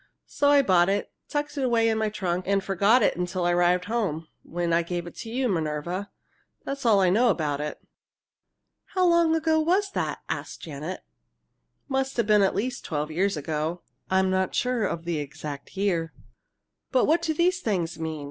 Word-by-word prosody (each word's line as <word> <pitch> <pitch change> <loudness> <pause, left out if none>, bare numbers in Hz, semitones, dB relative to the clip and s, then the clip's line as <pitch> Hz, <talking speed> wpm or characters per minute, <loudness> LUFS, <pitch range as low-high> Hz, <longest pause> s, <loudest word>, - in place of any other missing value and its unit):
So 285 - +1
I 285 -1 +6
bought 180 -4 +4
it, 200 +1 -1 0.2
tucked 295 -1 -2
it - - 0
away 235 -3 +3
in 225 - +2
my 220 -1 +1
trunk, 185 -3 -2
and 195 0 +2
forgot 200 +6 +3
it - - +3
till 180 0 -2
I 175 - +3
arrived 175 +1 +3
home, 195 -8 -2
when 170 0 -2
I 170 - +4
gave 175 0 -4
it 175 - -10
to 225 - -7
you, 255 +3 0
Minerva. 170 +1 -2 0.6
That's 275 -3 -3
all 205 -3 +5
I 185 -1 +4
know 235 +5 +4
about 150 -7 0
it." 150 - -4 1.2
"How 370 -1 +3
long 340 -2 +4
ago 320 0 +2
was 375 +5 +1
that?" - - -3
asked - - -5
Janet. 155 +3 -6 0.9
"Must 270 -1 -1
have 235 - +2
been 210 -1 +4
at 195 - +2
least 245 +4 -2
twelve 150 0 -3
years 190 +2 0
ago. 155 +3 -3 0.3
I'm 190 0 +2
not 190 0 0
sure 250 -3 +1
of 170 -2 -4
the 170 -3 -1
exact 145 +3 -7
year." 170 -5 0 0.8
"But 255 - +3
what 330 +2 +3
do 320 -2 -1
these 360 +4 +2
things 175 - -2
mean?" 160 -1 -3
195 Hz, 190 wpm, -26 LUFS, 170-250 Hz, 1.2 s, I